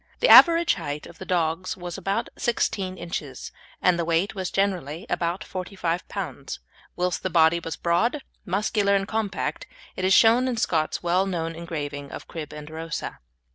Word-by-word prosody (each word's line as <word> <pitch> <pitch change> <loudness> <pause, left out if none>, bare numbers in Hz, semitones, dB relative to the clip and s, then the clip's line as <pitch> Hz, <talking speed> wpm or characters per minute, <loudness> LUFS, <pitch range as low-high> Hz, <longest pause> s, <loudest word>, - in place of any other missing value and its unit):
The - - +3
average 335 -1 +8
height 150 -4 -5
of - - -13
the 190 - -8
dogs 175 +1 0
was 175 -1 -6
about 195 0 -2
16 195 -5 -1
inches, 145 -7 -6 0.3
and 180 -1 +4
the - - +1
weight 165 +4 +1
was 190 -3 -3
generally 185 -4 -1
about 175 +4 -1
45 180 -2 -3
lbs., 145 -9 -5 0.4
whilst 180 0 -1
the 185 - -2
body 165 0 +4
was 165 -2 -5
broad, 235 - +1 0.2
muscular, 200 +1 +1
and 195 0 0
compact, 220 - -2 0.3
as 185 - -4
is 190 - +4
shown 235 +3 +5
in 250 -2 -1
Scott's 160 -7 0
well 180 +3 +2
known 165 -3 -2
engraving 145 -4 -5
of - - -8
"Crib 155 -3 -7
and 150 0 -9
Rosa." 160 - -5
180 Hz, 170 wpm, -25 LUFS, 165-195 Hz, 0.4 s, average